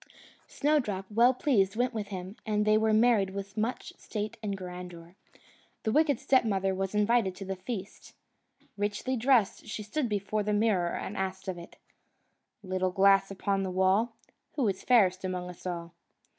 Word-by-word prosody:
Snowdrop, 250 -11 0
well 235 +4 +5
pleased, 210 -9 +2
went 245 +2 0
with 215 -3 -3
him, 185 0 -7
and 210 -1 0
they 215 0 +4
were 220 0 +3
married 215 -4 +3
with 200 0 -6
much 225 +3 -3
state 215 -1 -4
and 200 -2 -3
grandeur. 180 -1 -9 0.7
The 220 - 0
wicked 295 -1 +3
stepmother 200 -7 +2
was 195 +1 -3
invited 210 -2 +2
to 195 - -7
the 190 0 -3
feast. 195 +1 -7 0.6
Richly 205 +6 -1
dressed, 240 -4 +2
she 215 0 -5
stood 245 +4 -2
before 210 +1 -1
the 210 +1 -1
mirror, 205 -5 +1
and 205 - -5
asked 190 0 -4
of 185 -2 -3
it: 170 - -12 0.9
"Little 185 -1 -1
glass 195 +1 +4
upon 195 0 -1
the 190 - -2
wall, 190 +5 +2 0.4
Who 270 -6 0
is 190 - -3
fairest 195 -7 +4
among 180 -1 -3
us 180 - -10
all?" 170 -1 -5
200 Hz, 165 wpm, -29 LUFS, 190-225 Hz, 0.9 s, well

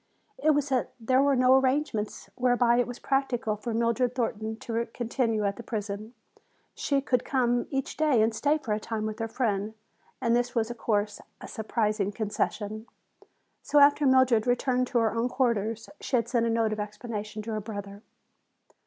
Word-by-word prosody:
It 310 -7 +3
was 290 -1 0
that 260 -2 0
there 255 +3 +3
were 280 0 +3
no 255 0 +5
arrangements 265 -5 0
whereby 245 -1 +3
it 245 - +2
was 245 0 -6
practical 255 -5 0
for 225 +3 -5
Mildred 235 +2 +1
Thornton 220 -3 -2
to 230 +1 -3
continue 230 -1 -1
at 200 0 -1
the - - -6
prison. 215 0 -5 0.6
She 280 -1 0
could 250 -2 +1
come 245 -2 +1
each 270 -1 -3
day 295 -8 +3
and 225 +1 +1
stay 290 +7 +2
for 245 -8 -3
a 210 - -1
time 215 0 -3
with 215 +1 -4
her 225 - -1
friend. 215 -3 -1 0.4
And 235 -1 +2
this 245 0 0
was, 230 0 0
of 240 - -9
course, 210 -2 -1 0.2
a - - -9
surprising 215 -2 -1
concession. 215 +1 -3 0.7
So 295 - 0
after 285 0 +6
Mildred 260 -4 +4
returned 250 +1 +1
to 245 - -1
her 225 -2 +2
own 230 +2 0
quarters 230 -3 0
she - - -2
had 230 -2 +1
sent 235 -1 +1
a - - +1
note 225 -1 +1
of 215 - -5
explanation 210 0 -5
to 225 - -5
her 215 -1 -2
brother. 200 -1 -7
235 Hz, 185 wpm, -28 LUFS, 215-255 Hz, 0.7 s, after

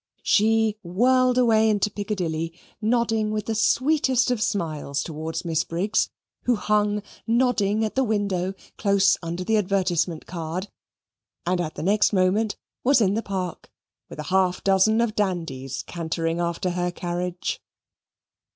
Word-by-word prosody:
She 220 0 +3
whirled 250 +7 +3
away 220 -3 +4
into 210 0 +1
Piccadilly, 170 -5 -3 0.2
nodding 225 -1 +1
with 215 -1 -2
the 225 - -1
sweetest 255 +3 +2
of 240 -3 -1
smiles 155 - -1
towards 160 +1 -5
Miss 165 -1 +1
Briggs, 195 +7 0 0.4
who 245 - +3
hung 210 -1 +1 0.2
nodding 225 -3 +2
at 215 - -3
the 265 - +2
window 200 -4 -1 0.2
close 200 -1 +4
under 170 +1 -4
the 220 +3 +2
advertisement 180 -4 0
card, 170 +3 -5 0.8
and 180 0 +1
at 155 -2 -4
the 150 - -5
next 205 +4 +3
moment 195 +3 +2 0.3
was 270 +1 +5
in 200 -3 +3
the 225 - 0
park 185 -5 -5 0.4
with - - -10
a 150 - -4
half 185 -1 +2
dozen 195 +4 +4
of 235 -2 0
dandies 165 - -2
cantering 165 0 -2
after 170 +1 -1
her 180 0 -1
carriage. 175 0 -3
195 Hz, 140 wpm, -24 LUFS, 175-220 Hz, 0.8 s, was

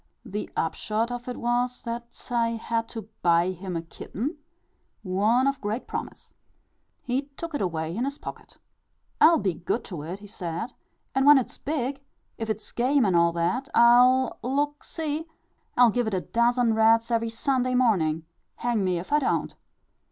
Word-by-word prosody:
The 210 -1 -4
upshot 215 +8 -1
of 245 0 -5
it 250 - -4
was, 245 +1 -1
that 235 0 -7
I 230 -1 +2
had 230 0 -2
to 220 -3 -7
buy 170 +1 +3
him 185 0 -6
a 165 - -2
kitten 255 - -5 0.6
one 210 +7 +2
of 275 -1 0
great 215 +4 -3
promise. - - -7 0.7
He 260 +3 -1
took 335 -1 -5
it 290 - -2
away 165 -2 -2
in 240 +4 0
his 280 +1 -4
pocket. - - -9 0.6
"I'll 325 +2 +8
be 190 - 0
good 175 +8 -2
to 175 -6 -7
it," 170 +5 -5
he 205 - -13
said; 190 +3 -5 0.4
"and 270 +1 +2
when 295 -1 +9
it's 260 - -2
big, 275 -2 -2 0.4
if 225 -1 -3
it's 215 0 -3
game 255 +1 +2
and 190 -3 +2
all 170 0 +4
that, 180 +11 -1
I'll 245 +2 +5
look, 290 +3 -1
see 315 0 -3 0.5
I'll 245 -2 +7
give 245 0 0
it 210 - -1
a 185 - 0
dozen 235 +1 +2
rats 225 +1 +4
every 230 0 +1
Sunday 255 +1 0
morning, 165 -11 +2 0.3
hang 235 -4 0
me 185 -2 +1
if 180 +11 -5
I 295 - +5
don't." 270 - -1
235 Hz, 175 wpm, -26 LUFS, 195-255 Hz, 0.7 s, when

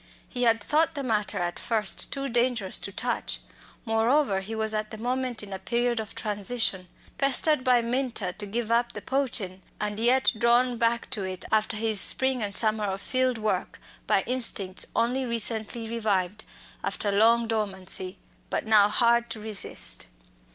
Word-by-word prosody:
He 250 - -6
had 225 -3 +2
thought 320 +1 +2
the 280 - -4
matter 215 -5 -1
at 175 0 -3
first 220 -4 0
too 275 0 -3
dangerous 240 -5 +1
to 200 - -5
touch. 235 +4 -2 0.5
Moreover, 225 0 +1
he 210 +4 -4
was 220 0 +2
at 215 0 -2
that 220 - -9
moment 250 -1 -2
in 200 -1 -8
a 190 - -5
period 240 +1 -1
of 215 -2 -7
transition, 210 -2 -1 0.3
pestered 275 +1 +3
by 250 -2 +3
Minta 235 -6 -2
to 205 - -5
give 230 +2 -3
up 235 +1 +1
"the - - -7
poachin'," 235 -9 -1 0.2
and 210 0 -3
yet 255 +4 +3
drawn 240 +1 +2
back 235 0 +1
to 210 - -1
it 185 -1 -5
after 215 0 +2
his 215 -3 +1
spring 260 +3 +1
and 200 -1 -1
summer 215 -1 +1
of 195 -1 -3
field 255 +3 0
work 215 -1 -3 0.3
by - - +2
instincts 220 -7 +1
only 250 +3 +1
recently 230 -1 0
revived, 210 -3 -2 0.4
after 205 - -2
long 230 +3 +3
dormancy, 190 -4 -1 0.3
but - - -3
now 210 -2 +5
hard 235 +1 +3
to 225 - -5
resist. 210 - +2
225 Hz, 165 wpm, -26 LUFS, 205-245 Hz, 0.5 s, now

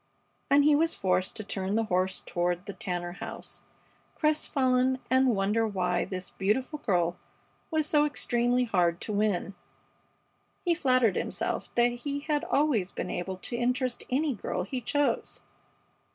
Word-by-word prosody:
And 285 +1 +6
he 300 +1 +5
was 325 +2 +2
forced 185 0 0
to 215 - -4
turn 195 0 -2
the 225 - +2
horse 185 -2 0
toward 175 +1 -1
the 200 - -6
Tanner 180 -5 -4
house, 175 - -8 0.5
crestfallen, 260 -4 +2
and 260 -2 +4
wonder 210 +3 +1
why 180 -3 0
this 185 -1 -5
beautiful 250 +10 -1
girl 175 -7 +1 0.5
was 315 -2 +1
so 295 -1 +3
extremely 245 -4 +1
hard 180 -7 +1
to 215 - -4
win. 205 -2 0 1.1
He 345 - +4
flattered 255 - +3
himself - - -2
that 240 0 +5
he 280 +4 -4
had 300 0 0
always 265 -11 +1
been - - -4
able 185 +1 -3
to 240 - -2
interest 250 +1 0
any 285 +3 +1
girl 185 -4 -3
he 250 +7 -4
chose. 290 +3 0
230 Hz, 150 wpm, -29 LUFS, 190-270 Hz, 1.1 s, And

